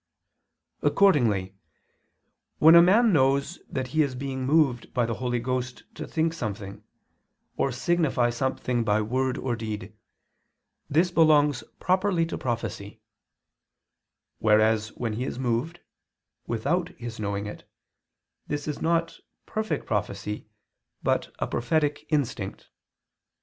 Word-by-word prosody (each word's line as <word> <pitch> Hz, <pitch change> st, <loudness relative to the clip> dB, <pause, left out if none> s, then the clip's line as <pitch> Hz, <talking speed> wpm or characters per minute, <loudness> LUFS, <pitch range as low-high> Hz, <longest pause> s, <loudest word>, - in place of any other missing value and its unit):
Accordingly, 115 Hz, -, +3 dB, 1.0 s
when 160 Hz, +2 st, +7 dB
a 170 Hz, -, +10 dB
man 210 Hz, +5 st, +5 dB
knows 140 Hz, +3 st, +2 dB
that 130 Hz, -1 st, -3 dB
he 155 Hz, +3 st, +2 dB
is 140 Hz, -4 st, 0 dB
being 130 Hz, 0 st, -4 dB
moved 140 Hz, -6 st, +2 dB
by 120 Hz, -2 st, +2 dB
the 115 Hz, -, -2 dB
Holy 125 Hz, +1 st, -2 dB
Ghost 125 Hz, +1 st, -3 dB
to -, -, -7 dB
think 160 Hz, 0 st, 0 dB
something, 100 Hz, -8 st, -6 dB, 0.7 s
or 135 Hz, -, 0 dB
signify 130 Hz, -3 st, +1 dB
something 125 Hz, -1 st, -1 dB
by 105 Hz, -1 st, +2 dB
word 130 Hz, +4 st, -1 dB
or 125 Hz, -2 st, -2 dB
deed, 110 Hz, -2 st, -6 dB, 1.0 s
this 170 Hz, +5 st, +2 dB
belongs 150 Hz, -5 st, +4 dB, 0.2 s
properly 185 Hz, -2 st, +2 dB
to 165 Hz, -, -5 dB
prophecy; 110 Hz, -3 st, -4 dB, 1.4 s
whereas 110 Hz, 0 st, +3 dB
when 115 Hz, -3 st, -3 dB
he 115 Hz, +4 st, -3 dB
is 130 Hz, -, -4 dB
moved, 130 Hz, +7 st, -2 dB, 0.7 s
without 165 Hz, +10 st, 0 dB
his 120 Hz, -2 st, -7 dB
knowing 100 Hz, -1 st, -2 dB
it, 105 Hz, -, -8 dB, 0.8 s
this 145 Hz, 0 st, -3 dB
is 150 Hz, -, -4 dB
not 165 Hz, 0 st, 0 dB, 0.3 s
perfect 220 Hz, 0 st, -3 dB
prophecy, 105 Hz, 0 st, -3 dB, 0.6 s
but -, -, 0 dB
a -, -, -1 dB
prophetic 145 Hz, +3 st, -1 dB
instinct. 145 Hz, -6 st, -2 dB
130 Hz, 120 wpm, -26 LUFS, 115-160 Hz, 1.4 s, a